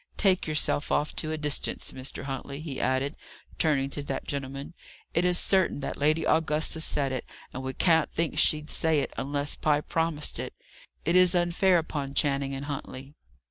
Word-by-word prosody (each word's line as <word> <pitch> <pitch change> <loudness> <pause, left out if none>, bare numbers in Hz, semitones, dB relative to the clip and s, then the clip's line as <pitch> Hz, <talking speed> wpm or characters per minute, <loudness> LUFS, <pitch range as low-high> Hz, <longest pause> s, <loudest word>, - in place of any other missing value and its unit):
"Take 190 -4 +2
yourself 150 -1 0
off 150 - 0
to 155 - 0
a 155 - -2
distance, 150 -2 -1
Mr. 130 +2 -5
Huntley," 140 +1 -5
he 150 -4 -5
added, 135 +3 0 0.4
turning 140 -4 +2
to 145 - -4
that 135 -2 -4
gentleman, 140 +2 -5 0.4
"it 170 - +2
is 180 -1 +4
certain 190 -6 +2
that - - -3
Lady 155 +3 +2
Augusta 160 0 +2
said 140 -4 +2
it; 130 - -3 0.3
and 130 - -5
we 130 0 -4
can't 165 -3 +3
think 165 -1 -1
she'd 150 0 +2
say 160 -3 +2
it, - - -4
unless 140 +1 -1
Pye 150 -1 +2
promised 160 -1 -1
it. - - -5 0.5
It 170 +3 +2
is 185 0 +6
unfair 175 +1 +3
upon 145 -4 -3
Channing 140 -1 +1
and 135 +1 -5
Huntley." 135 -1 -6
150 Hz, 180 wpm, -28 LUFS, 140-165 Hz, 0.5 s, is